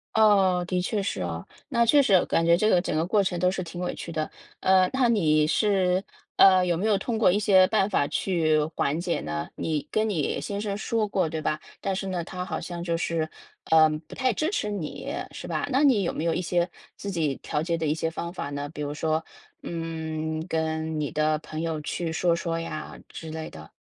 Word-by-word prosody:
哦， 195 -5 +4
的 180 -1 0
确 205 +3 -1
是 195 - -2
哦， - - -4 0.2
那 235 -4 +3
确 285 +4 +5
实 205 - +2
啊， 185 - +5
感 165 - +1
觉 170 0 +5
这 215 +4 +2
个 180 -4 +4
整 - - -3
个 160 +2 +1
过 200 +2 +2
程 180 -2 -1
都 180 +1 +3
是 185 0 -2
挺 175 +1 -8
委 180 - -2
屈 170 - -7
的。 155 -1 -2 0.3
呃， 185 -1 +4
那 260 -2 +2
你 155 -9 +3
是， 190 0 +2 0.3
呃， 185 -1 +7
有 175 -1 +1
没 185 +6 -2
有 210 -2 +3
通 225 +3 -2
过 210 -5 +5
一 205 - +2
些 190 -3 +6
办 210 -2 +2
法 165 -8 +2
去 160 -5 +1
缓 145 +4 0
解 175 -1 -1
呢？ 75 0 -3
你 150 -2 -2
跟 215 0 +1
你 160 -9 -1
先 200 0 -4
生 205 -1 -2
说 220 0 0
过， 190 -5 0
对 160 0 -3
吧？ 155 0 -1 0.2
但 195 -1 -2
是 195 0 -3
呢， 180 -3 -2
他 180 0 -5
好 185 - -4
像 175 -1 -6
就 170 -1 0
是， 165 -2 -1 0.4
呃， 160 -1 +7
不 155 +1 -6
太 255 -2 +1
支 310 - 0
持 415 - -1
你， 195 -7 -4 0.2
是 - - -8
吧？ - - -1
那 265 +3 +3
你 255 -9 +4
有 170 - 0
没 160 - -3
有 165 - +2
一 180 - -1
些 175 0 0 0.3
自 200 - -5
己 160 -7 0
调 150 - -2
节 170 0 0
的 160 - -2
一 150 - +1
些 165 0 -2
方 170 +1 -5
法 145 -6 -4
呢？ 145 0 -4
比 150 0 -8
如 145 0 -3
说， 155 +1 0 0.4
嗯， 160 -1 -4
跟 160 -1 -1
你 145 - -1
的 155 0 +1
朋 155 0 -6
友 160 -2 -2
去 165 +2 -3
说 170 +1 +2
说 165 -1 -2
呀 165 -2 -6
之 160 - -9
类 160 0 -5
的。 80 0 -12
170 Hz, 250 characters per minute, -26 LUFS, 160-195 Hz, 0.4 s, 呃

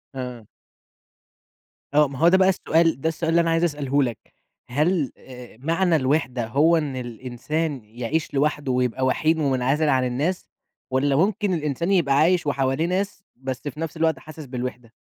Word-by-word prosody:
آه. 125 -4 -6 1.5
آه، 150 0 +5
ما 135 -1 -8
هو 165 - +5
ده 185 +2 +6
بقى 190 0 +4
السؤال، 165 -5 +2
ده 160 - +1
السؤال 165 0 -3
اللي 170 +1 +4
أنا 165 - 0
عايز 165 +1 +2
أسأله 145 -4 +1
لك، 120 -4 -2 0.5
هل 150 +2 +1
آآ، 125 -3 -12
معنى 165 +5 +1
الوِحدة 130 -4 0
هو 150 +8 +4
إن 145 -4 -2
الإنسان 130 +5 -4
يعيش 120 +8 -3
لوحده 145 -1 0
ويبقى 125 0 0
وحيد 160 +5 +2
ومنعزل 140 +2 +1
عن 130 -2 +3
الناس؟ 145 +9 -2 0.4
والَّا 135 +2 +2
ممكن 195 +4 +1
الإنسان 155 +2 -1
يبقى 165 -8 +3
عايش 170 +2 +3
وحواليه 135 +2 0
ناس، 195 +2 -2
بس 130 0 -5
في 145 +1 -6
نفس 165 0 -4
الوقت 160 0 +1
حاسس 155 -1 -10
بالوِحدة؟ 125 -2 -6
145 Hz, 165 wpm, -23 LUFS, 130-165 Hz, 1.5 s, ده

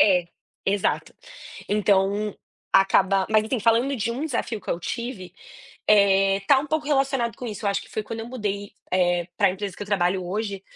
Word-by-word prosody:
É, 180 -4 +5 0.4
exato. 195 0 0 0.5
Então, 205 0 +1 0.4
acaba 195 0 +4
mas 215 0 +4
assim 225 +2 -2
falando 235 +5 +3
de 230 0 -1
um 255 +6 -3
desafio 235 -6 -2
que - - -6
eu 170 - -2
tive, 205 -1 -5 0.6
eh, 195 -1 +4
tá 275 - +6
um 290 - -5
pouco 310 0 -1
relacionado 270 -6 +1
com 250 - -6
isso, 215 -2 -6
acho 200 - 0
que - - -15
foi 215 - -3
quando 230 +1 -6
eu 225 - -7
mudei, 205 -5 -4 0.2
eh, 175 -1 +2
para - - +4
empresa 190 0 -5
que - - -4
eu - - -13
trabalho 185 -2 +1
hoje, 200 +1 -3
205 Hz, 185 wpm, -24 LUFS, 195-235 Hz, 0.6 s, tá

